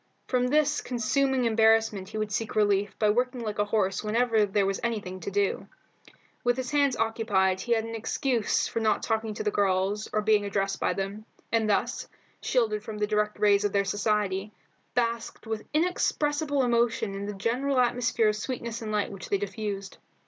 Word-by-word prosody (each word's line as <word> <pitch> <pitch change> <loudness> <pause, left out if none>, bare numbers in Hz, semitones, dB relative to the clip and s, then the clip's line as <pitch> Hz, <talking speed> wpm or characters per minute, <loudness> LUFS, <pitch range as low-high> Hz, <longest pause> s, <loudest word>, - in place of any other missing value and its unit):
From 250 -1 +1
this 300 +2 +2
consuming 260 +2 0
embarrassment 220 -3 +3
he - - -6
would 215 -1 -2
seek 220 +1 -2
relief 205 -1 +2
by 210 -1 +3
working 250 +2 0
like 210 -2 -4
a 205 - +3
horse 205 -2 0
whenever 220 -1 +2
there 200 0 +1
was 195 0 -1
anything 210 -6 -3
to 180 - -5
do. 200 0 0 0.8
With 245 0 +2
his 255 -1 -3
hands 285 -3 +2
occupied 205 -4 +1
he 240 - +1
had 225 -1 +1
an 225 - -6
excuse 230 +1 0
for - - -2
not 220 -1 +1
talking 220 -1 -1
to - - -4
the 210 - 0
girls 200 +1 0
or 215 - +1
being 210 -1 +3
addressed 195 -1 -1
by - - +1
them, 200 +2 -4 0.3
and, 225 -2 +2
thus 205 - 0 0.3
shielded 220 -4 +1
from 215 0 -6
the, 210 - +1
direct 210 0 0
rays 205 -1 +4
of 205 - 0
their 200 0 +2
society, 205 -1 0 0.4
basked 235 -1 -1
with 220 -1 -4
inexpressible 300 -3 +1
emotions 235 -4 +1
in 200 +1 -4
the 205 - -4
general 255 +7 0
atmosphere 240 -2 +2
of 210 - 0
sweetness 235 0 -4
and 215 -1 -4
light 210 -1 0
which 195 -1 -9
they 200 - +2
diffused. 200 0 -5
215 Hz, 185 wpm, -27 LUFS, 205-240 Hz, 0.8 s, rays